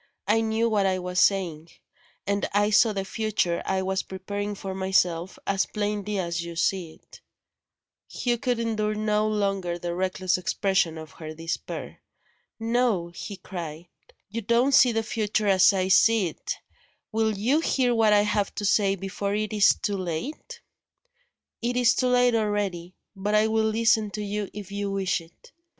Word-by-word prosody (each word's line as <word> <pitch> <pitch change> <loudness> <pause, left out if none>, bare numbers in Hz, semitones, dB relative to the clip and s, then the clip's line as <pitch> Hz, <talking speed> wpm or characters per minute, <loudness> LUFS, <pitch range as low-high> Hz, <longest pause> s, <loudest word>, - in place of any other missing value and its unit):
I 220 +2 +3
knew 225 +1 +1
what 205 -3 +2
I 185 -1 +1
was 180 0 -2
saying; 170 -5 +1 0.6
and 200 +1 -1
I 205 +1 +2
saw 220 +1 +5
the 195 -2 -3
future 210 -5 -1
I 190 0 0
was 190 0 0
preparing 205 +2 -5
for 195 -1 -6
myself, 190 -2 0
as 195 0 +1
plainly 210 -1 -2
as 170 -2 -2
you 170 0 -7
see 175 -1 -1
it - - -18 0.4
" - - -66
Hugh 240 -2 -1
could 250 -2 0
endure 215 -2 -1
no 215 0 +1
longer 195 -4 -1
the 175 0 -4
reckless 185 0 0
expression 180 -3 0
of 160 -2 -9
her 155 -1 -9
despair. 165 +1 -5 0.6
"No!" 225 -6 +1
he 190 +3 -8
cried, 170 -4 -7 0.4
"you 225 +3 -4
don't 235 +5 +2
see 255 - +7
your 225 -1 0
future 215 -1 -1
as 190 -1 +6
I 190 -1 0
see 210 -1 +4
it. - - -5 0.6
Will 220 -1 0
you 250 +10 +2
hear 255 -6 +1
what 225 -2 +3
I 205 0 +6
have 210 -1 -1
to 205 - -3
say, 195 -1 +3
before 195 +1 -3
it 215 +1 -2
is 205 -2 +5
too 205 -2 0
late?" 190 - -5 1.0
"It 245 +1 -1
is 245 -2 +4
too 255 - +1
late 250 -1 +4
already. 205 -5 -1 0.2
But 205 +2 -1
I 215 +1 +4
will 220 0 +1
listen 220 -1 +2
to 210 - -4
you 205 0 -3
if 205 -1 -9
you 200 0 -3
wish 195 -3 0
it." 165 +1 -19
205 Hz, 170 wpm, -26 LUFS, 185-220 Hz, 1.0 s, see